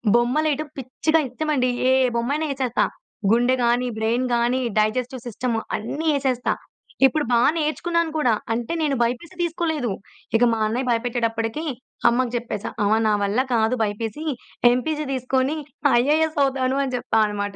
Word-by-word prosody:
బొమ్మలెయటం 295 +5 +1
పిచ్చిగా 270 +5 0
ఇత్తమండి. 265 -1 0 0.2
ఏ - - +5 0.2
బొమ్మయిన 275 +7 0
వేచేత్తా. 260 -3 0 0.5
గుండె 245 +3 +4
గానీ, 240 +1 +2
బ్రెయిన్ 230 +3 0
గానీ, 240 +2 +1 0.2
డైజెస్టివ్ 240 +4 0
సిస్టమ్ 240 +1 -2 0.2
అన్నీ 280 +9 -4
యేసేస్తా. 260 -3 0 0.5
ఇప్పుడు 295 +3 +2
బా 235 - +4 0.2
నేర్చుకున్నాను 330 +1 0
కూడా. 250 -7 +3 0.2
అంటే, 235 +6 -3
నేను 295 -3 +1
బైపీసీ 250 +10 -3
తీసుకోలేదు. 320 - -1 0.4
ఇక 225 - +3
మా 225 - -1
అన్నయ్య 250 +4 -2
బయపెట్టేటప్పడికీ 230 +2 -1 0.5
అమ్మకి 240 0 0
చెప్పేశా. 230 -4 -4
"అమ్మ 205 +1 +3
నా 215 - +3
వల్ల 200 +4 +1
కాదు 225 +1 +2
బైపీసీ, 220 +6 -3 0.5
ఎంపీసీ 300 +5 -1
తీసుకోనీ 260 +3 0 0.4
ఐఏఎస్ 310 +4 +1
అవుతాను" 265 -1 0
అని 265 -2 -3
చెప్పా 225 - 0
అనమాట. 205 -1 -4
250 Hz, 135 wpm, -23 LUFS, 230-295 Hz, 0.5 s, ఏ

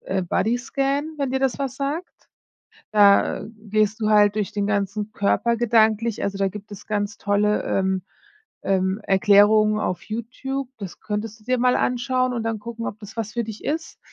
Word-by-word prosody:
äh, 190 0 -2
Bodyscan, 275 - -1
wenn 275 -2 -1
dir 265 - 0
das 270 -2 0
was 270 -2 -3
sagt. 290 +6 -2 0.9
Da 200 -1 +4
gehst 215 0 -1
du 215 -1 +1
halt 205 -1 +5
durch 210 -2 -1
den 205 -1 -1
ganzen 205 +1 -2
Körper 235 +3 +1
gedanklich, 225 -1 +2
also, 200 0 -2
da 195 -1 +2
gibt 210 +1 -10
es 205 - -10
ganz 205 -1 -2
tolle, 205 +1 +1
ähm, 190 -1 0 0.6
ähm, 190 +1 0
Erklärungen 210 +2 +5
auf 180 - -2
YouTube. 250 +4 -5
Das 195 -4 -8
könntest 215 +1 -4
du - - -22
dir 255 +2 +1
mal 250 +1 +3
anschauen 255 +1 0
und 235 -2 -2
dann 225 -1 -1
gucken, 230 +2 -6
ob 210 - -5
das 210 +1 -11
was 215 -2 -3
für 235 - -1
dich 220 -1 -9
ist. 320 +2 -3
215 Hz, 180 wpm, -23 LUFS, 205-240 Hz, 0.9 s, halt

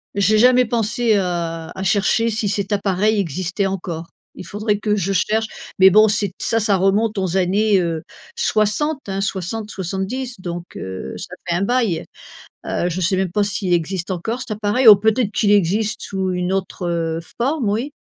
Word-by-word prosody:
J'ai 200 +2 +3
jamais 250 +2 +5
pensé 230 0 +1
à 170 -3 -2
à 190 - -6
chercher 210 +4 +2
si 215 -2 -1
cet 200 0 -1
appareil 205 +2 +1
existait 185 +3 -2
encore, 170 -4 -4 0.3
il - - -9
faudrait 210 0 -1
que 210 0 0
je 195 0 -1
cherche 220 +4 +1 0.3
mais 190 0 +8
bon 215 +2 +6
c'est 205 -3 0
ça 225 - +1
ça 205 -2 +2
remonte 200 +3 +1
aux 190 -1 0
années, 195 +2 +2
heu, 165 -2 -2 0.3
60, 260 +8 +1
hein, 195 0 -2
60-70 195 +4 -4
donc 175 -1 -7
heu, 95 -8 -6
ça - - -8
fait 170 - 0
un 180 - 0
bail. 220 -6 0 0.6
Heu, 175 - -1
je 180 +2 -3
sais 185 +2 +1
même 190 -2 -1
pas 205 +2 +1
s'il 200 -3 0
existe 175 +2 -1
encore 220 +7 -3
cet 250 - -7
appareil 215 +4 +1
ou 210 - +12
peut-être 220 +2 +1
qu'il 205 -1 +2
existe 205 +2 +1
sous 190 -1 -2
une 180 +1 -1
autre 170 -3 -2 0.2
forme, 260 -1 0
oui. 235 +8 -2
200 Hz, 175 wpm, -20 LUFS, 180-220 Hz, 0.6 s, ou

